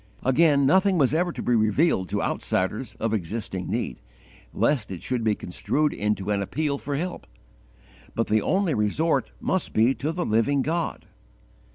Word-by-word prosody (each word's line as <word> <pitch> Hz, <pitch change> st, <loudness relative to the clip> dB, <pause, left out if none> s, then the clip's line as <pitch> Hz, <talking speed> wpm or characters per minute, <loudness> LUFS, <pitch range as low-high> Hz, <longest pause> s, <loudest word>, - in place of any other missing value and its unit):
Again, 140 Hz, +1 st, +4 dB
nothing 190 Hz, +6 st, +4 dB
was 140 Hz, -3 st, +3 dB
ever 175 Hz, +2 st, +1 dB
to -, -, -6 dB
be 120 Hz, -, +2 dB
revealed 110 Hz, -, +2 dB
to -, -, -1 dB
outsiders 105 Hz, +6 st, -1 dB
of 115 Hz, -1 st, -2 dB
existing 95 Hz, -1 st, -3 dB
need, -, -, -3 dB, 0.5 s
lest 130 Hz, -8 st, +1 dB
it 95 Hz, -3 st, -7 dB
should 125 Hz, -2 st, -2 dB
be 110 Hz, -2 st, +2 dB
construed 150 Hz, +13 st, -1 dB
into 105 Hz, -1 st, -1 dB
an 100 Hz, -1 st, +1 dB
appeal 140 Hz, +7 st, -2 dB
for 145 Hz, -, -3 dB
help; 175 Hz, +5 st, -4 dB, 0.9 s
but 115 Hz, -, +1 dB
the 110 Hz, 0 st, +2 dB
only 190 Hz, -, +1 dB
resort 125 Hz, +10 st, +1 dB
must 190 Hz, -2 st, -1 dB
be 115 Hz, +4 st, +4 dB
to 145 Hz, +3 st, -3 dB
the 175 Hz, +1 st, -2 dB
living 125 Hz, +6 st, +2 dB
God. 165 Hz, +3 st, -2 dB
130 Hz, 165 wpm, -25 LUFS, 105-160 Hz, 0.9 s, Again